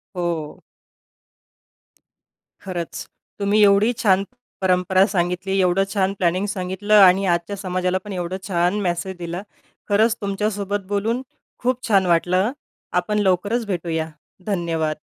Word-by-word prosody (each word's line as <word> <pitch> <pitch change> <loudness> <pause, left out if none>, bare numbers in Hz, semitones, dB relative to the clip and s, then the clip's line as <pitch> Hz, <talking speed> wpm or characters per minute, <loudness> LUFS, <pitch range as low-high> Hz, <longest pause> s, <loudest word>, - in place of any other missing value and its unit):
हो. 170 -4 -3 2.0
खरंच, 175 -4 -5 0.3
तुम्ही 205 +1 +2
एवढी 200 +3 +5
छान 195 -2 +4 0.4
परंपरा 185 +1 +3
सांगितली, 185 +2 0
एवढं 185 +1 +3
छान 195 -2 +1
प्लॅनिंग 180 +2 +1
सांगितलं 190 +2 -2
आणि 190 +1 +6
आजच्या 175 +2 0
समाजालापण 185 +1 -2
एवढं 180 0 -3
छान 180 +2 +1
मेसेज 180 0 -2
दिला. 170 +1 -4 0.5
खरंच 215 +2 +3
तुमच्यासोबत 200 0 -2
बोलून 220 +5 0 0.4
खूप 255 0 -1
छान 195 -3 +4
वाटलं. 180 +5 +2 0.5
आपण 210 +4 -1
लवकरच 205 +4 +1
भेटूया, 165 -4 -2 0.4
धन्यवाद. 165 -5 -1
190 Hz, 110 wpm, -22 LUFS, 175-205 Hz, 2.0 s, आणि